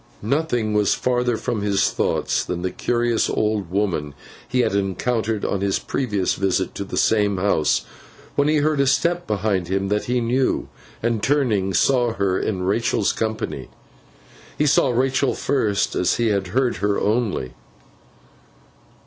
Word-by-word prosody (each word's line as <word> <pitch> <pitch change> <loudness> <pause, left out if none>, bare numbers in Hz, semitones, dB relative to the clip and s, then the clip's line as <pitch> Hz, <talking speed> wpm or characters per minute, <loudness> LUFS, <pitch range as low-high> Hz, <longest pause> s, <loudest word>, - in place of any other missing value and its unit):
Nothing 120 -3 0
was 105 -1 +2
further 125 -2 0
from 110 -1 -2
his 100 -1 +1
thoughts - - 0
than 90 0 -4
the 95 - -1
curious 120 -1 0
old 105 -4 -1
woman 90 -7 -1 0.3
he 125 0 +1
had 120 - 0
encountered 105 +2 -1
on 100 - -1
his 100 -1 +1
previous 105 -8 -1
visit 95 -1 -1
to - - -4
the 100 - -6
same 105 -3 +2
house, 90 -6 +1 0.5
when 145 - +2
he 155 0 +3
heard 150 0 +1
a 140 - +3
step 170 +6 +1
behind 100 -4 0
him 95 +1 -1
that 105 +1 0
he 125 +1 0
knew, 125 +3 0 0.4
and 115 -2 0
turning, 115 -9 +1
saw 120 +5 +2
her 100 -3 0
in 95 -4 -2
Rachael's 100 +1 +1
company. 110 -1 -3 0.9
He 150 - +2
saw 140 -1 +3
Rachael 130 +2 +1
first, 110 -8 0
as 90 - +2
he 115 -1 +1
had 100 -2 0
heard 125 +6 0
her 100 +2 0
only. 105 - -1
110 Hz, 155 wpm, -22 LUFS, 100-125 Hz, 0.9 s, he